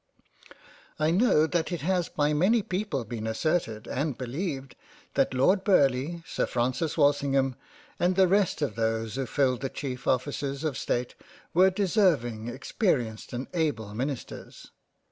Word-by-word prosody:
I 155 Hz, +1 st, +2 dB
know 180 Hz, -5 st, +4 dB
that 170 Hz, +2 st, -1 dB
it 175 Hz, -4 st, -3 dB
has 180 Hz, +2 st, 0 dB
by 150 Hz, 0 st, +1 dB
many 200 Hz, +9 st, +3 dB
people 180 Hz, -, -2 dB
been 110 Hz, 0 st, -5 dB
asserted 110 Hz, -2 st, -1 dB
and 140 Hz, -1 st, -2 dB
beleived 135 Hz, +1 st, -4 dB, 0.4 s
that -, -, +2 dB
Lord 185 Hz, +10 st, +3 dB
Burleigh, 155 Hz, -2 st, +2 dB
Sir -, -, -1 dB
Francis 130 Hz, +7 st, -1 dB
Wal 145 Hz, -2 st, +6 dB
singham, 135 Hz, -2 st, 0 dB, 0.5 s
and 180 Hz, +1 st, +2 dB
the 190 Hz, 0 st, +5 dB
rest 190 Hz, -4 st, +2 dB
of 145 Hz, -, -1 dB
those 115 Hz, -1 st, -1 dB
who 135 Hz, -1 st, -3 dB
filled 130 Hz, -1 st, +1 dB
the 135 Hz, -, -2 dB
cheif 130 Hz, -2 st, -6 dB
offices 140 Hz, +2 st, -1 dB
of 155 Hz, -4 st, -1 dB
State 120 Hz, 0 st, -2 dB, 0.4 s
were 185 Hz, +3 st, +6 dB
deserving, 175 Hz, -, +1 dB
experienced, 125 Hz, -, -1 dB
and 125 Hz, +2 st, -4 dB
able 125 Hz, -, -1 dB
Ministers. 130 Hz, +3 st, -6 dB
140 Hz, 145 wpm, -27 LUFS, 125-175 Hz, 0.5 s, Wal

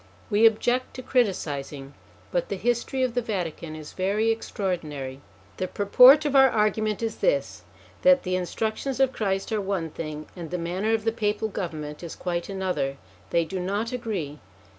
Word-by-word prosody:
We 215 Hz, +2 st, +7 dB
object 245 Hz, +3 st, 0 dB
to 255 Hz, -, -7 dB
criticising, 145 Hz, -, -1 dB, 0.4 s
but -, -, -1 dB
the -, -, -1 dB
history 245 Hz, +2 st, 0 dB
of 255 Hz, -2 st, 0 dB
the 245 Hz, -, +1 dB
Vatican 170 Hz, -7 st, -4 dB
is 155 Hz, -1 st, -9 dB
very 205 Hz, +4 st, +1 dB
extraordinary. 155 Hz, -11 st, -4 dB, 0.4 s
The 185 Hz, -, -1 dB
purport 255 Hz, +11 st, +7 dB
of 285 Hz, -1 st, 0 dB
our 270 Hz, -1 st, +8 dB
argument 215 Hz, 0 st, 0 dB
is 225 Hz, -, -2 dB
this, -, -, 0 dB, 0.4 s
that 275 Hz, 0 st, +5 dB
the 185 Hz, 0 st, -1 dB
instructions 220 Hz, +8 st, -2 dB
of 265 Hz, -1 st, +3 dB
Christ 195 Hz, 0 st, -1 dB
are 215 Hz, -1 st, 0 dB
one 190 Hz, -5 st, -2 dB
thing, 155 Hz, -1 st, -6 dB
and 170 Hz, -3 st, -7 dB
the 180 Hz, -, -2 dB
manner 185 Hz, +6 st, 0 dB
of 220 Hz, -, -3 dB
the 225 Hz, -, +2 dB
Papal 215 Hz, -1 st, -1 dB
government 155 Hz, -6 st, -5 dB
is 170 Hz, -2 st, -7 dB
quite 175 Hz, 0 st, -3 dB
another: 180 Hz, -9 st, -2 dB, 0.3 s
they 170 Hz, -1 st, +2 dB
do 190 Hz, +3 st, -4 dB
not 200 Hz, +5 st, -2 dB
agree. 200 Hz, -, -4 dB
200 Hz, 170 wpm, -26 LUFS, 170-230 Hz, 0.4 s, our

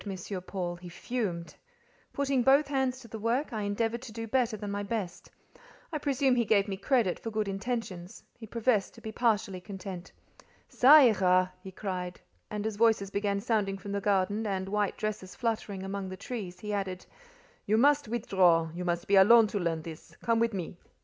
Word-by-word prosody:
Paul; 175 Hz, -3 st, -3 dB
he 175 Hz, 0 st, -10 dB
fumed. 175 Hz, -3 st, -4 dB, 0.6 s
Putting 275 Hz, -2 st, 0 dB
both 275 Hz, +4 st, +4 dB
hands 265 Hz, -2 st, 0 dB
to 235 Hz, -, -12 dB
the 220 Hz, 0 st, -7 dB
work, 240 Hz, +6 st, -1 dB
I 215 Hz, -, -2 dB
endeavoured 225 Hz, +3 st, -1 dB
to 255 Hz, -3 st, -9 dB
do 225 Hz, +1 st, -5 dB
better 230 Hz, -1 st, 0 dB
than 205 Hz, 0 st, -5 dB
my 205 Hz, 0 st, -2 dB
best; 200 Hz, -3 st, -4 dB, 0.6 s
I 305 Hz, -, -1 dB
presume 275 Hz, -2 st, +2 dB
he 240 Hz, -, +2 dB
gave 205 Hz, -2 st, +3 dB
me 195 Hz, -, -3 dB
credit 215 Hz, -2 st, +1 dB
for 225 Hz, -, -5 dB
good 215 Hz, -1 st, -2 dB
intentions; 195 Hz, -3 st, -4 dB
he 225 Hz, -, -11 dB
professed 225 Hz, -2 st, 0 dB
to -, -, -14 dB
be 220 Hz, -, -6 dB
partially 215 Hz, -5 st, 0 dB
content. 190 Hz, -2 st, -8 dB, 0.6 s
"Ca 270 Hz, +5 st, +7 dB
ira!" 185 Hz, -9 st, +5 dB
he 190 Hz, -, -9 dB
cried; 180 Hz, -2 st, -5 dB, 0.3 s
and 210 Hz, 0 st, -4 dB
as 220 Hz, -2 st, -3 dB
voices 220 Hz, -3 st, +3 dB
began 200 Hz, 0 st, -1 dB
sounding 205 Hz, -4 st, 0 dB
from 200 Hz, +1 st, -8 dB
the 200 Hz, 0 st, -2 dB
garden, 205 Hz, +2 st, +1 dB
and 190 Hz, -1 st, -2 dB
white 205 Hz, -1 st, 0 dB
dresses 210 Hz, -3 st, -4 dB
fluttering 215 Hz, -5 st, -2 dB
among 195 Hz, 0 st, -4 dB
the 185 Hz, -, -7 dB
trees, 185 Hz, -6 st, -6 dB
he 210 Hz, -1 st, -4 dB
added: 190 Hz, -2 st, -3 dB, 0.6 s
"You 215 Hz, +2 st, +3 dB
must 285 Hz, +2 st, +4 dB
withdraw: 180 Hz, -8 st, +2 dB
you 180 Hz, +1 st, -5 dB
must 175 Hz, -1 st, -2 dB
be 200 Hz, -, +4 dB
alone 225 Hz, +4 st, +8 dB
to 205 Hz, -, -2 dB
learn 165 Hz, -3 st, -1 dB
this. 160 Hz, -1 st, -10 dB
Come 230 Hz, -1 st, +2 dB
with 230 Hz, -2 st, +1 dB
me." 180 Hz, -2 st, -5 dB
205 Hz, 190 wpm, -29 LUFS, 190-230 Hz, 0.6 s, alone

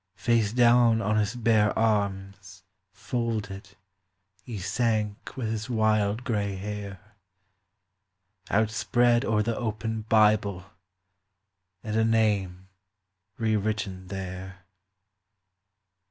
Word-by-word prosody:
Face 115 Hz, -3 st, +1 dB
down 120 Hz, -1 st, +4 dB
on 110 Hz, 0 st, 0 dB
his 105 Hz, +2 st, 0 dB
bare 110 Hz, -3 st, +2 dB
arms 100 Hz, -3 st, -2 dB, 0.3 s
folded 105 Hz, -5 st, -4 dB, 0.7 s
he 115 Hz, -4 st, -7 dB
sank 105 Hz, +3 st, -2 dB
with 115 Hz, -4 st, -2 dB
his 110 Hz, +2 st, -4 dB
wild 110 Hz, -1 st, +1 dB
grey 100 Hz, -5 st, -1 dB
hair 100 Hz, 0 st, -6 dB, 1.5 s
Outspread 120 Hz, +3 st, +2 dB
o'er 105 Hz, -3 st, +1 dB
the 115 Hz, +1 st, -1 dB
open 110 Hz, -1 st, -3 dB
Bible 105 Hz, -4 st, +3 dB, 1.2 s
and 110 Hz, -1 st, -4 dB
a 110 Hz, -, +3 dB
name 100 Hz, -5 st, 0 dB, 0.7 s
re 110 Hz, -1 st, +1 dB
written 100 Hz, -3 st, -3 dB
there. 95 Hz, -1 st, -7 dB
105 Hz, 95 wpm, -27 LUFS, 100-115 Hz, 1.5 s, down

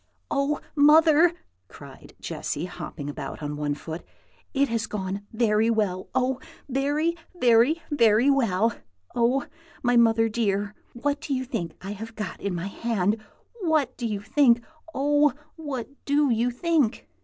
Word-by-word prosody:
"Oh, 280 Hz, +1 st, +1 dB, 0.2 s
mother!" 315 Hz, +3 st, +6 dB, 0.4 s
cried -, -, -13 dB
Jessy, -, -, -4 dB
hopping 145 Hz, -, -7 dB
about 145 Hz, +1 st, -6 dB
on 150 Hz, 0 st, -3 dB
one 145 Hz, -1 st, -1 dB
foot, 160 Hz, +3 st, -7 dB, 0.5 s
"it 280 Hz, 0 st, +2 dB
has 230 Hz, -3 st, -1 dB
gone 200 Hz, 0 st, -4 dB
very 220 Hz, -1 st, +2 dB
well! 205 Hz, -5 st, 0 dB
oh, 260 Hz, 0 st, +1 dB, 0.3 s
very, 290 Hz, +5 st, 0 dB, 0.2 s
very, 245 Hz, +6 st, +4 dB
very 230 Hz, -3 st, +4 dB
well! 230 Hz, -6 st, +3 dB, 0.4 s
Oh, 245 Hz, +4 st, +2 dB, 0.4 s
my 245 Hz, -1 st, +3 dB
mother 225 Hz, -1 st, +4 dB
dear, 205 Hz, -2 st, -1 dB, 0.2 s
what 285 Hz, +4 st, -2 dB
do 285 Hz, -3 st, -2 dB
you 260 Hz, 0 st, -2 dB
think 190 Hz, -10 st, -4 dB
I 195 Hz, -, -5 dB
have 220 Hz, +2 st, -7 dB
got 210 Hz, -5 st, -5 dB
in 200 Hz, -3 st, -2 dB
my 170 Hz, +1 st, -3 dB
hand? 210 Hz, 0 st, -1 dB, 0.4 s
What 310 Hz, -7 st, +1 dB
do 240 Hz, -, -3 dB
you 205 Hz, -2 st, -3 dB
think? 240 Hz, 0 st, +3 dB, 0.3 s
oh, 290 Hz, -1 st, +3 dB, 0.2 s
what 285 Hz, -7 st, -5 dB, 0.2 s
do 285 Hz, -1 st, +3 dB
you 235 Hz, +2 st, +2 dB
think?" 275 Hz, -1 st, 0 dB
235 Hz, 145 wpm, -25 LUFS, 210-280 Hz, 0.5 s, mother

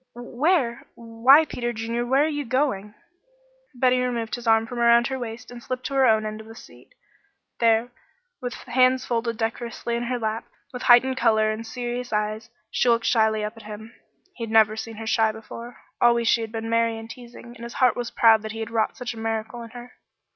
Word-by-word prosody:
"Where? 245 Hz, +1 st, 0 dB
why 235 Hz, +6 st, +4 dB
Peter 240 Hz, -5 st, -3 dB
Junior! 230 Hz, +1 st, -3 dB
Where 270 Hz, +3 st, +3 dB
are -, -, +1 dB
you 290 Hz, -2 st, -3 dB
going?" 240 Hz, -6 st, -1 dB, 0.8 s
Betty 250 Hz, 0 st, +3 dB
removed 240 Hz, -3 st, -2 dB
his 240 Hz, -1 st, -5 dB
arm 225 Hz, 0 st, +4 dB
from 240 Hz, +1 st, -6 dB
around 235 Hz, 0 st, +5 dB
her 265 Hz, -1 st, -3 dB
waist 235 Hz, 0 st, -7 dB
and 245 Hz, -1 st, -10 dB
slipped 255 Hz, +1 st, -5 dB
to -, -, -4 dB
her 270 Hz, -1 st, +4 dB
own 220 Hz, -1 st, +3 dB
end 215 Hz, 0 st, -5 dB
of 220 Hz, -, -14 dB
the 225 Hz, -, -12 dB
seat. -, -, -16 dB, 0.6 s
There, 230 Hz, +1 st, +3 dB, 0.5 s
with 245 Hz, -1 st, -4 dB
hands 255 Hz, 0 st, +2 dB
folded 230 Hz, -1 st, -2 dB
decorously 235 Hz, +1 st, -3 dB
in 235 Hz, -, -2 dB
her 250 Hz, +1 st, -2 dB
lap, 220 Hz, -1 st, -3 dB, 0.3 s
with 250 Hz, -, -6 dB
heightened 255 Hz, +2 st, +5 dB
color 220 Hz, -2 st, +3 dB
and 225 Hz, +1 st, -6 dB
serious 245 Hz, 0 st, -5 dB
eyes, 215 Hz, +1 st, -2 dB, 0.2 s
she 245 Hz, -, +1 dB
looked 230 Hz, -1 st, +2 dB
shyly 220 Hz, -2 st, +2 dB
up 210 Hz, +2 st, -4 dB
at -, -, -11 dB
him. 220 Hz, +2 st, -9 dB, 0.4 s
He 235 Hz, -, -7 dB
had -, -, -10 dB
never 220 Hz, -1 st, +4 dB
seen 220 Hz, +1 st, -7 dB
her 225 Hz, +1 st, -7 dB
shy 220 Hz, 0 st, +2 dB
before. 230 Hz, +2 st, -10 dB, 0.2 s
Always 235 Hz, -1 st, +4 dB
she 230 Hz, -, +3 dB
had 225 Hz, -1 st, -5 dB
been 225 Hz, 0 st, -5 dB
merry 230 Hz, 0 st, +1 dB
and 225 Hz, 0 st, -9 dB
teasing, 240 Hz, 0 st, -12 dB
and 235 Hz, -, -11 dB
his 235 Hz, 0 st, -7 dB
heart 250 Hz, -2 st, +3 dB
was 240 Hz, -1 st, -4 dB
proud 225 Hz, -2 st, +5 dB
that 220 Hz, 0 st, -6 dB
he 225 Hz, -, -7 dB
had 225 Hz, 0 st, -5 dB
wrought 225 Hz, -1 st, 0 dB
such 245 Hz, -1 st, -5 dB
a 225 Hz, -, -10 dB
miracle 225 Hz, +1 st, -3 dB
in 230 Hz, -, -9 dB
her. 245 Hz, +1 st, -11 dB
235 Hz, 215 wpm, -24 LUFS, 225-245 Hz, 0.8 s, around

